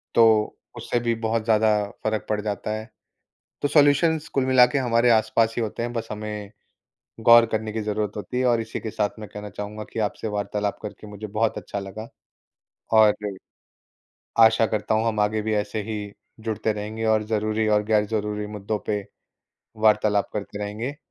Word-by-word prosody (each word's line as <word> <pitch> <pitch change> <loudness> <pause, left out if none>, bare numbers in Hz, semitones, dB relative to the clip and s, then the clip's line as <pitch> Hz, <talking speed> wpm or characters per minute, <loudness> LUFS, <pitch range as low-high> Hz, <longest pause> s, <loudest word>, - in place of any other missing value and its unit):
तो 110 -2 +4 0.2
उससे 120 - -1
भी 115 -1 0
बहुत 110 0 0
ज़्यादा 110 -1 +4 0.3
फ़र्क 110 -1 -1
पड़ 105 -1 0
जाता 105 0 -3
है। 110 +1 -6 0.7
तो 145 - +2
सॉल्यूशंस 150 +2 +3
कुल 135 -2 +2
मिला 130 -1 +7
के - - +2
हमारे 120 -2 +3
आसपास 110 +1 +3
ही - - +1
होते 115 +1 -3
हैं, 120 0 -3
बस 115 -1 -3
हमें 105 -1 -6 0.7
गौर 115 +1 +7
करने 110 0 -1
की 110 0 -3
ज़रूरत 105 -1 -2
होती 105 +5 -4
है। 130 - +1
और 120 -2 +3
इसी 110 - -5
के 110 - -5
साथ 105 +1 -2
मैं 105 -2 -8
कहना 105 0 -7
चाहूँगा 105 +2 -6
कि 115 - -3
आपसे 110 - -7
वार्तालाप 100 0 -2
करके 105 0 -8
मुझे 105 +1 -7
बहुत 110 +2 0
अच्छा 100 - -5
लगा। 100 +3 -7 0.9
और 110 -1 +6 1.3
आशा 115 0 +4
करता 110 0 -1
हूँ, 110 +1 +1
हम 110 -2 -1
आगे 105 +1 +1
भी 110 +1 -1
ऐसे 105 +1 -2
ही 105 -1 -5 0.3
जुड़ते 110 -1 -1
रहेंगे, 110 +2 -4
और 110 -1 +3
ज़रूरी 110 0 0
और 105 0 +3
गैर-ज़रूरी 105 -1 0
मुद्दों 105 +1 -3
पे 105 -2 -1 0.8
वार्तालाप 105 -1 +3
करते 105 0 -5
रहेंगे। 110 +7 -4
110 Hz, 175 wpm, -24 LUFS, 105-115 Hz, 1.3 s, मिला